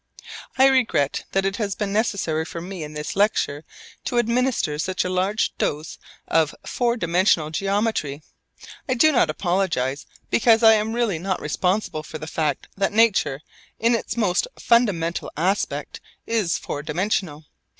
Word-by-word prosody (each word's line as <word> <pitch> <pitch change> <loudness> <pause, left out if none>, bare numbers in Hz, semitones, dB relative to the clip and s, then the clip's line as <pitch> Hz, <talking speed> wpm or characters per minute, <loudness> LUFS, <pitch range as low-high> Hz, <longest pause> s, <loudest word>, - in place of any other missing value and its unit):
I 265 - +6
regret 250 - +2
that 195 0 +1
it 195 +1 -1
has 200 -4 -2
been 200 -1 -3
necessary 200 -8 0
for 170 - -7
me 180 0 -6
in 150 0 -8
this 150 0 -5
lecture 195 -8 +1 0.4
to 245 - -1
administer 235 - +1
such 185 +3 -1
a - - -1
large 190 +4 0
dose 150 +2 -2 0.3
of 160 -2 +2
four 240 -1 0
dimensional 170 -4 +2
geometry. 195 -6 -1 0.7
I 255 - +2
do 310 +6 +5
not 240 - +3
apologise, 155 -6 -1 0.2
because 230 0 +4
I 220 0 +9
am 215 +1 0
really 230 -8 0
not 190 +2 -2
responsible 180 +2 -1
for 155 - -8
the 155 - -7
fact 155 -3 -2
that 195 0 0
nature 210 -11 +3 0.4
in 230 +2 +2
its 230 0 -2
most 205 - +1
fundamental 195 -9 +1
aspect 190 +6 -1 0.2
is 215 -7 0
four 145 - -5
dimensional. 160 -1 -2
190 Hz, 150 wpm, -23 LUFS, 155-220 Hz, 0.7 s, I